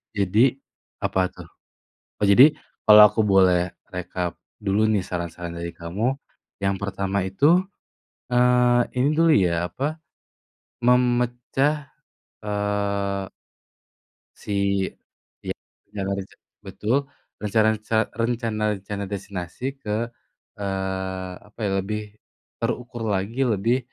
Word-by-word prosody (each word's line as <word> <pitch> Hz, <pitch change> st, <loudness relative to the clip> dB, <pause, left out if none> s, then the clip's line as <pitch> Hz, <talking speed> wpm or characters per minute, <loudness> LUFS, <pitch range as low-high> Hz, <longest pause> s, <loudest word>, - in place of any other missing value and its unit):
Jadi, 105 Hz, +6 st, +3 dB, 0.5 s
apa 95 Hz, -, 0 dB
tuh? -, -, -12 dB, 0.7 s
Oh, 105 Hz, -, 0 dB
jadi 130 Hz, +10 st, +7 dB, 0.3 s
kalau 105 Hz, 0 st, +11 dB
aku 110 Hz, -, -2 dB
boleh 95 Hz, -3 st, +4 dB, 0.2 s
rekap 90 Hz, -1 st, -3 dB, 0.3 s
dulu 105 Hz, +2 st, +1 dB
nih 100 Hz, -4 st, +1 dB
saran-saran 85 Hz, -1 st, -5 dB
dari 85 Hz, 0 st, -4 dB
kamu. 105 Hz, +11 st, -1 dB, 0.5 s
Yang 100 Hz, 0 st, +2 dB
pertama 100 Hz, 0 st, -1 dB
itu, 150 Hz, -, +4 dB, 0.7 s
eee, 125 Hz, 0 st, +4 dB, 0.2 s
ini 135 Hz, -, +3 dB
dulu 165 Hz, 0 st, +4 dB
ya, 90 Hz, -2 st, +2 dB
apa, 145 Hz, +4 st, -2 dB, 0.9 s
memecah, 125 Hz, +4 st, +2 dB, 0.6 s
eee 100 Hz, -1 st, -1 dB, 1.1 s
si 100 Hz, -1 st, 0 dB, 0.6 s
iya, -, -, -3 dB, 0.3 s
rencana-rencana 100 Hz, -1 st, -5 dB, 0.2 s
betul, 110 Hz, +5 st, -1 dB, 0.4 s
rencana 110 Hz, +1 st, +2 dB
reca 110 Hz, +1 st, -1 dB
rencana-rencana 110 Hz, -4 st, -2 dB
destinasi 100 Hz, +2 st, -5 dB
ke, 115 Hz, -1 st, -2 dB, 0.5 s
eee, 95 Hz, -1 st, -3 dB, 0.2 s
apa 105 Hz, -, -23 dB
ya, 100 Hz, -, 0 dB
lebih 105 Hz, +2 st, -3 dB, 0.6 s
terukur 120 Hz, -1 st, -3 dB
lagi, 100 Hz, +7 st, -1 dB
lebih 115 Hz, +1 st, +2 dB
105 Hz, 100 wpm, -24 LUFS, 95-120 Hz, 1.1 s, kalau